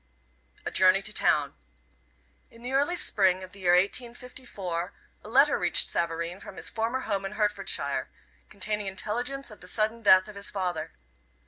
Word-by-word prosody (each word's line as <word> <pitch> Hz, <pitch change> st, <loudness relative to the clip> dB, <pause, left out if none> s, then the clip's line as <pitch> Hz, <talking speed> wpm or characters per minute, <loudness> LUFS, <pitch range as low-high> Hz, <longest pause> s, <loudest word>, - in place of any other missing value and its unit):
A -, -, -2 dB
JOURNEY -, -, +4 dB
TO -, -, -3 dB
TOWN. -, -, +2 dB, 1.0 s
In 230 Hz, +1 st, -17 dB
the 250 Hz, -, -4 dB
early 285 Hz, +6 st, +2 dB
spring 190 Hz, -, +2 dB
of 185 Hz, -, -10 dB
the 200 Hz, -, -14 dB
year 175 Hz, -2 st, +3 dB
1854 200 Hz, -3 st, -2 dB, 0.3 s
a 210 Hz, -, -10 dB
letter 275 Hz, +5 st, +4 dB
reached 175 Hz, -1 st, +5 dB
Savareen 170 Hz, +2 st, -2 dB
from 190 Hz, -, -10 dB
his -, -, -5 dB
former 230 Hz, +3 st, -1 dB
home 200 Hz, -5 st, -2 dB
in 195 Hz, -, -5 dB
Hertfordshire, 210 Hz, -1 st, -1 dB, 0.4 s
containing 210 Hz, +1 st, -3 dB
intelligence 240 Hz, +7 st, -3 dB
of 210 Hz, -, -13 dB
the 180 Hz, -, -11 dB
sudden 220 Hz, +4 st, 0 dB
death 185 Hz, -3 st, +6 dB
of 210 Hz, -, -9 dB
his 200 Hz, 0 st, -4 dB
father. 175 Hz, -5 st, -3 dB
205 Hz, 160 wpm, -28 LUFS, 185-235 Hz, 1.0 s, death